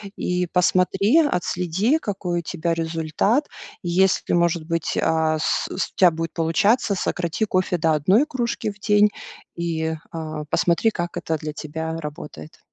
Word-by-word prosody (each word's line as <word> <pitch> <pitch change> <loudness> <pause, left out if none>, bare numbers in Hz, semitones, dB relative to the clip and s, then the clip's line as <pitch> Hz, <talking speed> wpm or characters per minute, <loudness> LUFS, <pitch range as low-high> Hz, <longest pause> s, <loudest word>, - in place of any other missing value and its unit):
и 180 0 -1
посмотри, 190 - +3
отследи 190 - +1
какой 190 - -3
у - - -3
тебя 170 0 -2
результат. 165 - 0 0.4
И 175 - -3
если 190 +2 +2
может 170 -2 +1
быть, 165 0 -2
а, 160 -1 +1
с - - 0
с 185 - -3
у - - -53
тебя 185 - +6
будет 165 +1 -4
получаться, 200 +7 +2
сократи 175 +2 -1
кофе 185 -3 0
до 160 -1 +2
1 185 - +3
кружки 235 -5 -2
в 200 - -17
день 210 0 +4 0.5
и, 160 -1 -2 0.2
а, 155 -2 -5
посмотри 170 +9 +2
как 175 -3 -4
это 160 - -2
для 155 -1 -5
тебя 160 +2 -5
работает. 150 - -9
175 Hz, 155 wpm, -22 LUFS, 160-195 Hz, 0.5 s, тебя